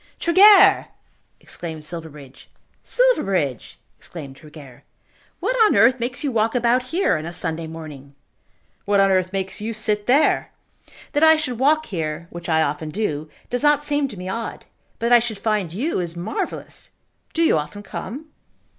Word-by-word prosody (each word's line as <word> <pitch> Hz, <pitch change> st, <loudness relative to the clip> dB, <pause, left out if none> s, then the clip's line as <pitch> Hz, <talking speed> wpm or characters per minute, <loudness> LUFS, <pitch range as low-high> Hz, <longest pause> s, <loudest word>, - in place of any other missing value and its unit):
"Tregear!" 385 Hz, +4 st, +6 dB, 0.5 s
exclaimed 160 Hz, -3 st, -8 dB
Silverbridge. 150 Hz, -5 st, -10 dB, 0.3 s
"Silverbridge!" 195 Hz, -, 0 dB, 0.2 s
exclaimed 140 Hz, -6 st, -9 dB
Tregear. 145 Hz, -4 st, -14 dB, 0.6 s
"What -, -, -1 dB
on -, -, +3 dB
earth 235 Hz, +5 st, +5 dB
makes 250 Hz, +4 st, -3 dB
you 285 Hz, -, -1 dB
walk 225 Hz, 0 st, 0 dB
about 240 Hz, +1 st, +2 dB
here 335 Hz, -, +1 dB
on 155 Hz, -, -7 dB
a -, -, -5 dB
Sunday 165 Hz, -1 st, -4 dB
morning?" 150 Hz, -4 st, -10 dB, 0.7 s
"What 205 Hz, 0 st, +2 dB
on 195 Hz, 0 st, +4 dB
earth 185 Hz, -1 st, +1 dB
makes 190 Hz, +1 st, -4 dB
you 225 Hz, +2 st, -3 dB
sit 210 Hz, -1 st, -1 dB
there? 275 Hz, +5 st, +2 dB, 0.6 s
That 290 Hz, -, +1 dB
I 320 Hz, 0 st, +7 dB
should 255 Hz, -7 st, -3 dB
walk 310 Hz, +4 st, +3 dB
here, 160 Hz, -, -4 dB
which 175 Hz, 0 st, -8 dB
I 160 Hz, -1 st, +3 dB
often 150 Hz, +1 st, -3 dB
do, 155 Hz, -5 st, -3 dB, 0.2 s
does 245 Hz, -, -1 dB
not 295 Hz, 0 st, +3 dB
seem 290 Hz, -1 st, 0 dB
to 215 Hz, -, -10 dB
me 180 Hz, +1 st, -7 dB
odd. 225 Hz, +5 st, -5 dB, 0.3 s
But 235 Hz, -, -1 dB
that 245 Hz, -, +7 dB
I -, -, +3 dB
should 225 Hz, -2 st, -4 dB
find 210 Hz, -6 st, -1 dB
you 255 Hz, -, -2 dB
is 170 Hz, -1 st, -4 dB
marvellous. 195 Hz, +7 st, -5 dB, 0.5 s
Do 330 Hz, -, +2 dB
you 315 Hz, -, +3 dB
often 150 Hz, +8 st, -7 dB
come?" 275 Hz, +8 st, -7 dB
205 Hz, 165 wpm, -21 LUFS, 160-255 Hz, 0.7 s, I